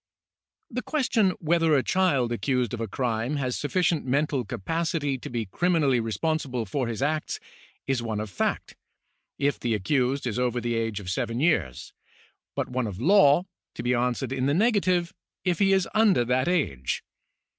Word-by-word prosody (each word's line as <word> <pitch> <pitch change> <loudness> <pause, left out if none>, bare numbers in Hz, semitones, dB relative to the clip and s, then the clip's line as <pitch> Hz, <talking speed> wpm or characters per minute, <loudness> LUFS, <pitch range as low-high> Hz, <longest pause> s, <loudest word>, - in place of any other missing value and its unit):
The 250 +1 -2
question 250 -9 +1
whether 165 -1 +2
a 135 - +2
child 140 -11 +2
accused 125 -1 0
of 115 -2 -3
crime 120 +3 -1
has 130 -3 -1
sufficient 170 +1 0
mental 140 0 0
capacity 150 - -2
to - - -7
be 120 -2 -2
criminally 150 - +2
responsible 125 +1 -1
for 130 +5 -2
his 115 +2 -3
acts, 155 +1 -1 0.5
is 135 -3 0
one 110 -2 -3
of 105 -2 -5
fact, - - -2 0.6
if 140 0 0
the 115 -2 0
accused 130 +6 0
is 120 -1 -2
over 125 -1 0
the 120 0 -2
age 115 -2 -1
of 90 -2 -5
seven 115 +5 -2
years, 140 - 0 0.6
but - - -1
one 125 -2 -2
of 100 -2 -6
law 170 - +5 0.3
(to 115 - -5
be 125 +1 +1
answered 125 +1 0
in 130 0 0
the 140 - +2
negative) 185 -5 +2 0.3
if 180 -3 +1
he 195 -1 +4
is 190 -2 +3
under 210 - +4
that 125 +2 +1
age. 135 - -1
135 Hz, 165 wpm, -26 LUFS, 120-165 Hz, 0.6 s, law